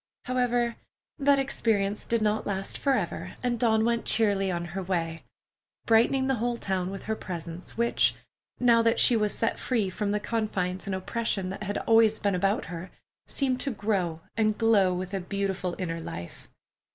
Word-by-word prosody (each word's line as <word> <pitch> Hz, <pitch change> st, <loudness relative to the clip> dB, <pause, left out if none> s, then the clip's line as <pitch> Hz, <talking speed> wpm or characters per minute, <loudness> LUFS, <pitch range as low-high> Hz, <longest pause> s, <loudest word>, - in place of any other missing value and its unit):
However, 245 Hz, -2 st, 0 dB, 0.4 s
that 280 Hz, 0 st, +4 dB
experience 215 Hz, -7 st, 0 dB
did 230 Hz, -2 st, +1 dB
not 215 Hz, 0 st, 0 dB
last 195 Hz, -1 st, -2 dB
forever 250 Hz, -, -1 dB
and 240 Hz, -2 st, 0 dB
Dawn 220 Hz, -2 st, +3 dB
went 235 Hz, 0 st, +1 dB
cheerily 200 Hz, -3 st, +3 dB
on 175 Hz, -1 st, -2 dB
her 195 Hz, -, -2 dB
way, 165 Hz, -3 st, -2 dB, 0.7 s
brightening 235 Hz, +4 st, +4 dB
the 265 Hz, -, +2 dB
whole 240 Hz, 0 st, 0 dB
town 185 Hz, -4 st, -2 dB
with 195 Hz, 0 st, -7 dB
her 220 Hz, -, -2 dB
presence, 170 Hz, -1 st, -7 dB
which, 235 Hz, 0 st, +3 dB, 0.4 s
now 235 Hz, -2 st, +5 dB
that 230 Hz, 0 st, +2 dB
she 245 Hz, -, +5 dB
was 210 Hz, -2 st, +2 dB
set 225 Hz, -, -1 dB
free 220 Hz, -7 st, 0 dB
from 205 Hz, +2 st, -2 dB
the 210 Hz, +1 st, +1 dB
confines 200 Hz, -4 st, -2 dB
and 195 Hz, -, -1 dB
oppression 195 Hz, -1 st, -2 dB
that 195 Hz, -, -7 dB
had 205 Hz, 0 st, -2 dB
always 225 Hz, -1 st, +4 dB
been 200 Hz, -1 st, 0 dB
about 195 Hz, +3 st, +1 dB
her, 175 Hz, +1 st, -7 dB, 0.4 s
seemed 260 Hz, -3 st, 0 dB
to 280 Hz, -, +1 dB
grow 195 Hz, -8 st, -1 dB
and 215 Hz, -1 st, +1 dB
glow 215 Hz, -5 st, +4 dB
with 185 Hz, +1 st, -4 dB
a 195 Hz, -, 0 dB
beautiful 190 Hz, -1 st, -2 dB
inner 165 Hz, -3 st, -3 dB
life. 85 Hz, -, -8 dB
210 Hz, 175 wpm, -27 LUFS, 185-230 Hz, 0.7 s, now